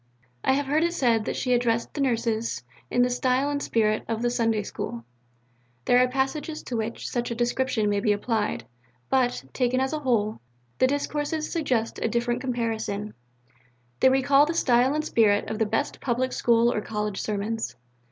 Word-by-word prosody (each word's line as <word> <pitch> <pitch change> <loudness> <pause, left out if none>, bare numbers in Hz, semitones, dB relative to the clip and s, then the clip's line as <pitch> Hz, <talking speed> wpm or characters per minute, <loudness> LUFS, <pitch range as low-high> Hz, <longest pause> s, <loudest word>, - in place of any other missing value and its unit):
I 265 - +3
have 285 +1 0
heard 300 +4 +2
it 340 +1 0
said 230 -7 +2
that - - -2
she 250 - 0
addressed 235 -1 +1
the 290 - -3
Nurses 230 -3 0 0.3
in 245 - +3
the 250 - +2
style 255 +3 +1
and 285 0 -2
spirit 215 -4 +1
of 230 0 -2
the 240 - +2
Sunday 225 -3 +1
School. 115 -11 -6 0.8
There 245 - +5
are 255 - +5
passages 270 +4 -2
to 245 - -5
which 225 0 -3
such 240 -1 -2
a 235 - -3
description 240 -2 0
may 205 0 +1
be 210 +1 +2
applied; 205 - -1 0.5
but, 255 - +2
taken 255 0 +1
as 265 +3 0
a 310 - -1
whole, 225 -6 0 0.4
the 260 - +5
discourses 295 +2 -2
suggest 255 -9 -1
a - - +1
different 240 +1 -1
comparison: 225 -5 -2 0.9
they - - +6
recall 275 +2 +4
the 330 - -2
style 255 -2 +3
and 305 0 -1
spirit 210 -7 +3
of 220 - -3
the 220 - +2
best 220 +1 -2
Public 255 0 -1
School 235 0 +3
or 210 - -1
College 210 -2 -3
Sermons. 210 - -3
240 Hz, 180 wpm, -26 LUFS, 220-265 Hz, 0.9 s, they